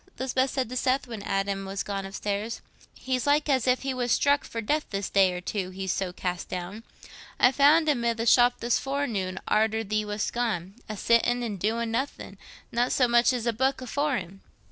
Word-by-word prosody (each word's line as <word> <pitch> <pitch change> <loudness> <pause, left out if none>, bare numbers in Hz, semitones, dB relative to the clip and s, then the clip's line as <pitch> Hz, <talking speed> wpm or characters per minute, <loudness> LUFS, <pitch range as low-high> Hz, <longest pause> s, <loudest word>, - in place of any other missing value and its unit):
Lisbeth 260 +1 0
said 260 -2 -1
to 255 - -6
Seth, 260 +1 +1
when 230 -4 -7
Adam 195 0 -1
was 195 0 -4
gone 195 -1 -4
upstairs. 205 +3 -3 0.3
"He's 260 0 -2
like 295 +1 +3
as 265 -3 +1
if 255 +1 +2
he 270 -1 -1
was 245 -2 -2
struck 285 +3 +3
for 230 - -6
death 295 +8 -1
this 195 -1 -3
day 195 -2 +4
or 180 0 -5
two—he's 190 -1 -3
so 190 -2 -2
cast 180 -1 -4
down. 185 +4 -5 0.6
I 250 - +6
found 295 +4 +5
him 275 -6 +1
i' 235 - +3
the 230 0 -3
shop 245 +1 +4
this 235 0 +1
forenoon, 230 -10 -2
arter 220 +1 +2
thee 215 +1 -1
wast 210 0 -3
gone, 205 -7 -2 0.2
a 215 - -5
sittin' 240 +3 +2
an' 215 -4 -3
doin' 225 +4 -1
nothin'—not 245 -1 -4
so 255 - +3
much 240 +1 +4
as 245 -2 -3
a 235 - +1
booke 265 +4 0
afore 280 +2 -1
him." 190 +1 -8
230 Hz, 200 wpm, -27 LUFS, 195-255 Hz, 0.6 s, I